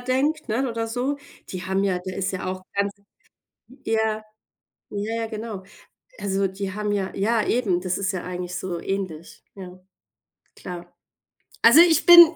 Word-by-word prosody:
denkt, 270 +5 0
ne? 250 +4 +1
Oder 230 -1 -2
so. 250 +5 -1 0.3
Die 185 -1 -5
haben 190 +1 +1
ja 185 -2 +1
da 185 - -4
ist 195 0 -1
ja 185 - -4
auch 185 0 -3
ganz 200 0 +1 0.9
ja, 220 -1 0 0.7
ja, 205 +2 -3
ja, 225 - -2
genau. 220 -3 -6 0.6
Also 195 0 +1
die 190 0 -5
haben 210 0 -2
ja 195 -2 -1
ja, 215 +3 +2
eben, 200 -8 +1
das 185 -1 -1
ist 200 0 0
ja 185 - -3
eigentlich 180 0 -5
so 180 -2 -3
ähnlich. 185 -4 -4
Ja. 185 -2 -9 0.8
Klar. 175 -1 -8 0.7
Also 260 +9 +9
ich 340 -1 +5
bin 345 -1 +10
200 Hz, 160 wpm, -24 LUFS, 185-230 Hz, 0.9 s, bin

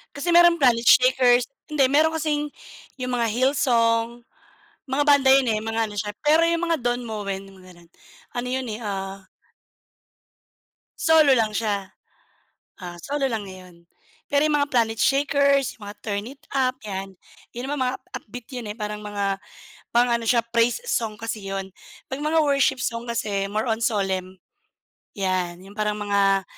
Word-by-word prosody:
Kasi 285 +5 -3
meron 345 -2 +6
Planet 235 -2 +4
Shakers 250 -1 +5 0.2
hindi 300 -2 +1
meron 310 +3 +3
kasing 300 -2 -2 0.5
yung 255 0 -2
mga 235 - +1
Hill 260 +4 +2
Song. 230 -2 +1 0.7
Mga 270 +3 +1
banda 285 -2 +5
yun 270 -2 +4
eh, 215 - 0
mga 225 +1 -2
ano 205 - -9
siya, 205 +1 -3
pero 320 +3 +4
yung 335 0 0
mga 335 -3 +1
Don 245 0 -1
Moen 200 -3 -4
mga 185 -2 -15
ganun, 170 -1 -20 0.4
ano 245 +1 -4
yun 260 +1 -2
eh, 215 - -5
ah 195 -2 -5 1.7
Solo 320 -4 +5
lang 225 -4 +2
siya, 200 -4 -2 0.9
ah, 175 -1 -7
solo 280 -1 -1
lang 225 -4 -3
ngayon. 185 -3 -13 0.5
Pero 290 +2 +3
'yong 295 - +2
mga 285 0 +1
Planet 225 -2 +2
Shakers, 280 -1 +2
mga 205 -1 -9
Turn 205 -1 -3
It 270 +3 -11 0.2
Up 260 -1 +1
'yan, 195 -2 -6 0.4
'yon 245 +3 -6
naman 285 -3 -1
mga 250 - -1 0.2
upbeat 235 +2 -10
'yon 220 -4 -5
parang 210 -1 -6
mga 200 -1 -2 0.5
pang 240 +1 +4
ano, 235 -1 0
siya 235 0 +2
praise 235 0 +2
song 220 - -1
kasi 225 -2 -5
'yon. 195 -1 -5 0.3
'Pag 265 +2 -5
mga 315 +2 +1
worship 275 -2 +2
song 235 0 -3
kasi 200 -4 -2
more 215 +4 -1
on 225 0 -1
solemn. 190 -4 -1 0.8
Yan, 185 -3 -2
yung 195 - -13
parang 210 0 0
mga 200 -2 +2
230 Hz, 165 wpm, -23 LUFS, 205-270 Hz, 1.7 s, meron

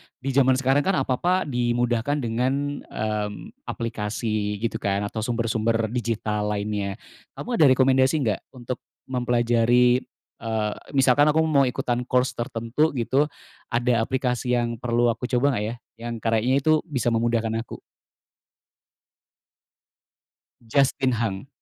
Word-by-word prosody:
di 135 +1 -4
zaman 130 -1 +4
sekarang 135 +2 +2
kan 195 - +2
apa-apa 175 +9 +1
dimudahkan 120 0 0
dengan, 130 +5 -1
mmm, 105 - -5
aplikasi 105 -2 -2
gitu 115 - -1
kan 100 0 0
atau 105 +2 -4
sumber-sumber 115 -1 0
digital 110 -3 -1
lainnya. 100 -1 -2 0.4
Kamu 240 -4 -3
ada 155 - +7
rekomendasi 130 +2 +4
nggak 105 -4 0 0.2
untuk 125 0 -5 0.3
mempelajari, 120 0 +3 0.4
eee, 110 -2 -1 0.2
misalkan 135 +2 +5
aku 160 +1 +3
mau 140 -4 +3
ikutan 125 0 -2
course 125 0 +2
tertentu 120 +5 -1
gitu 135 +5 +1 0.4
ada 120 0 +1
aplikasi 125 -1 0
yang 120 -1 -1
perlu 120 -1 +2
aku 120 +2 -4
coba 125 0 +2
nggak - - -2
ya 115 - -4 0.2
yang 120 0 -5
kayanya 115 +4 +2
itu 155 +2 +4
bisa 130 -5 0
memudahkan 115 -1 +1
aku? - - -10 2.8
Justin 135 +1 +2
Hunk. 110 0 -2
120 Hz, 125 wpm, -24 LUFS, 115-130 Hz, 2.8 s, ada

